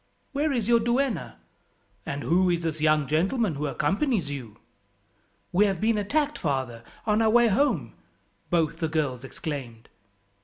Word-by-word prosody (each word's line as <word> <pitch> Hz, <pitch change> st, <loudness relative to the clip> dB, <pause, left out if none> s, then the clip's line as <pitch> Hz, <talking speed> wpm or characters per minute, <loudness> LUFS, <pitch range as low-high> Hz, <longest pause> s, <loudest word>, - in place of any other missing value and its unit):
Where 290 Hz, +1 st, 0 dB
is 235 Hz, -6 st, -1 dB
your 235 Hz, -1 st, +5 dB
duenna? 240 Hz, +1 st, 0 dB, 0.7 s
and 140 Hz, 0 st, -3 dB
who 180 Hz, +2 st, +3 dB
is 170 Hz, -1 st, 0 dB
this 160 Hz, -2 st, -2 dB
young 155 Hz, -1 st, +3 dB
gentleman 190 Hz, -, +1 dB
who 150 Hz, +1 st, -2 dB
accompanies 195 Hz, -, 0 dB
you?" 120 Hz, -6 st, -7 dB, 0.9 s
"We 205 Hz, +4 st, +4 dB
have 190 Hz, -3 st, -1 dB
been 220 Hz, 0 st, +2 dB
attacked, 290 Hz, +8 st, 0 dB
father, 130 Hz, -7 st, -2 dB, 0.2 s
on 215 Hz, 0 st, +2 dB
our 220 Hz, -, +4 dB
way 240 Hz, +1 st, +5 dB
home," 200 Hz, -, +1 dB, 0.6 s
both 165 Hz, -3 st, +1 dB
the 160 Hz, -, 0 dB
girls 145 Hz, -6 st, -1 dB
exclaimed. 130 Hz, -5 st, -6 dB
175 Hz, 150 wpm, -26 LUFS, 145-230 Hz, 0.9 s, your